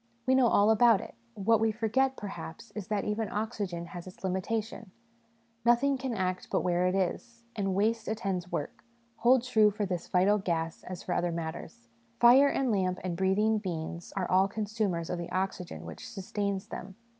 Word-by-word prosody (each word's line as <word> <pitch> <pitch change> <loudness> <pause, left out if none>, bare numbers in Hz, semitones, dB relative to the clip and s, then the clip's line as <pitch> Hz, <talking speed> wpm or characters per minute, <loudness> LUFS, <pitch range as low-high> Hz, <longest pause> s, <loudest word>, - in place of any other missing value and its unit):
We 260 - +3
know 260 -2 +5
all 210 -1 +4
about 225 -1 +5
it - - -9 0.2
;' - - -37
what 225 -1 +5
we 225 0 +2
forget, 240 +5 +1
perhaps, 195 +1 -8
is, 210 -4 -6
that 210 -2 -1
even 210 0 -1
oxygen 205 -5 -3
has 175 +1 -9
its 185 - -13
limitation: 210 +4 -2 0.7
nothing 240 +4 +4
can 260 -2 -3
act 185 -2 -2
but - - +1
where 180 0 +1
it 185 - 0
is, 230 +5 -2
and, 195 -3 -1
waste 220 +3 +1
attends 195 -5 -2
work, 145 - -4 0.3
hold 245 +1 +4
true 220 -4 +4
for 210 0 -2
this 180 -3 -3
vital 195 +3 +3
gas 165 -3 -2
as 180 -1 -7
for 180 - -2
other 175 0 0
matters. 160 -7 -6 0.3
Fire 250 +4 +7
and 270 -3 +1
lamp 185 -3 +1
and 180 -2 -2
breathing 205 +4 +2
beings 170 -3 -5
are 190 -2 -1
all 190 +1 +4
consumers 205 -5 -2
of 180 - -2
the 170 - -5
oxygen 185 -1 -3
which - - -8
sustains 200 -2 -3
them. 190 0 -7
200 Hz, 185 wpm, -30 LUFS, 180-225 Hz, 0.7 s, Fire